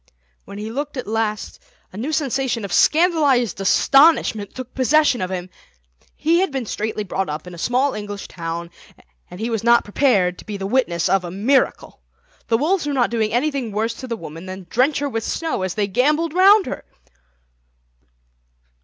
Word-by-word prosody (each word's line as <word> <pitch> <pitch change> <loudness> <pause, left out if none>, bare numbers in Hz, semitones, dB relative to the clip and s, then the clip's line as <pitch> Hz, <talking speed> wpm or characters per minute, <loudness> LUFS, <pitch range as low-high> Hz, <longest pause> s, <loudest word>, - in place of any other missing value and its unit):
When 200 - -10
he 215 +2 -5
looked 285 +3 -4
at 255 - -4
last 215 -1 -3 0.3
a - - -11
new 245 +9 -3
sensation 265 -6 -1
of 195 - -6
scandalised 295 - +3
astonishment 270 - +3
took 255 -1 -8
possession 265 -2 +2
of 185 - -2
him. 180 -1 -5 0.6
He 330 +3 +2
had 380 0 +1
been 265 -3 -3
straitly 215 0 -3
brought 190 -2 -3
up 150 +2 -5
in 180 - -10
a 170 - -10
small 255 +7 +1
English 205 -1 -6
town, 170 0 -6 0.6
and 180 - -10
he 230 +2 -2
was 225 -2 -2
not 235 0 +5
prepared 205 -6 +1
to - - -12
be 210 -2 -4
the 195 - -5
witness 195 -7 +1
of 195 -1 +2
a 175 - -5
miracle. 225 +9 0 0.5
The 225 - +2
wolves 330 +4 0
were 290 - -1
not 245 -4 +1
doing 225 -2 0
anything 260 -1 -1
worse 220 +3 -1
to 260 - -7
the 230 -2 -3
woman 165 -1 -9
than 185 0 -8
drench 265 +5 +2
her 285 - -1
with 225 -4 -3
snow 325 - -2
as 185 -1 -3
they 210 - +1
gambolled 300 - +1
round 390 +2 +6
her. - - -6
230 Hz, 185 wpm, -21 LUFS, 195-280 Hz, 0.6 s, round